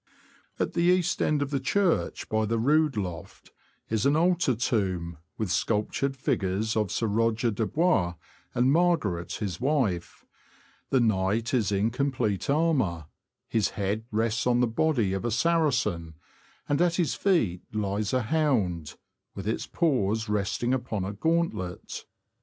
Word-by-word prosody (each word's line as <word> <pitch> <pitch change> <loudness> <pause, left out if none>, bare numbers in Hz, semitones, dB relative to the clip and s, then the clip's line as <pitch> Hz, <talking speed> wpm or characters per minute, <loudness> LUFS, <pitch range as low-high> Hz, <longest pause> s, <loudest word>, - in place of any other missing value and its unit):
At - - -1
the - - 0
east 175 0 +2
end 150 -1 +2
of 140 - -6
the 140 - 0
church, 185 +6 0
by 110 0 +1
the 115 +2 0
rood 150 +3 +2
loft, 90 -5 -6 0.4
is 110 -1 -1
an 140 - +3
altar 170 -5 +2
tomb, 95 -8 -1 0.2
with 105 -5 -2
sculptured 115 +8 0
figures 105 -2 -1
of 105 -3 +1
Sir 115 - 0
Roger 115 +2 +1
de 110 +1 -1
Bois 130 - +1 0.4
and 125 +2 +3
Margaret 140 - +1
his 95 -6 -4
wife; 125 - -1 0.6
the 135 - +3
knight 110 +1 +1
is 110 -6 +2
in 100 +3 +1
complete 125 -6 -1
armour; 140 - +1 0.4
his 110 -3 +1
head 105 +2 -1
rests 115 +2 0
on 120 -1 +3
the 125 - +4
body 115 -4 +1
of 95 - -2
a 120 - 0
Saracen, 125 - +1 0.5
and 145 +2 +1
at 175 -1 +3
his 170 -4 +1
feet 115 - +1
lies 105 -1 -1
a 130 -2 +1
hound, 105 - 0 0.4
with 100 0 -6
its 110 - -2
paws 115 - 0
resting 105 +4 0
upon 115 -6 -2
a 100 - -4
gauntlet. 135 - -2
115 Hz, 150 wpm, -27 LUFS, 100-145 Hz, 0.6 s, the